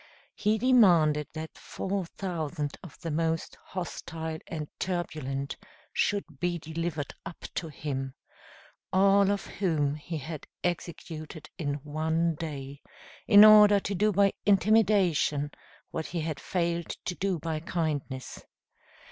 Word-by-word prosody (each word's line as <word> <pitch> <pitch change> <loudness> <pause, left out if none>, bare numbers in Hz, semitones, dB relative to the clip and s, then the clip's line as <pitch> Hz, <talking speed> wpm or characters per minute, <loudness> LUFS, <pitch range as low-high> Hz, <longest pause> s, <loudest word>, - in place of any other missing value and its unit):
He 210 +1 +1
demanded 175 - +5
that 160 0 -6
four 190 -2 -3
thousand 160 -6 -3
of 175 -6 -12
the 165 -2 -3
most 165 +1 -1
hostile 160 -3 -5
and 155 -3 -4
turbulent 150 -7 -3 0.4
should 170 -9 -1
be 175 -1 0
delivered 160 -2 -4
up 170 - -9
to 165 - -3
him, 135 -3 -4 0.8
all 195 +1 +5
of 200 0 0
whom 155 -7 0
he 155 +2 -5
had 155 +1 -7 0.2
executed 160 -3 -4
in 145 -3 -1
one 160 +2 0
day, 145 -3 -6 0.5
in 205 +1 +10
order 210 -1 +8
to 200 - -3
do 210 +3 +2
by 200 0 +4
intimidation 195 -8 +3 0.4
what 160 - -3
he 170 -1 -3
had 155 -3 -3
failed 170 0 -1 0.2
to 180 - -1
do 190 0 -1
by 160 0 -3
kindness. 155 -6 -3
165 Hz, 125 wpm, -29 LUFS, 150-190 Hz, 0.8 s, in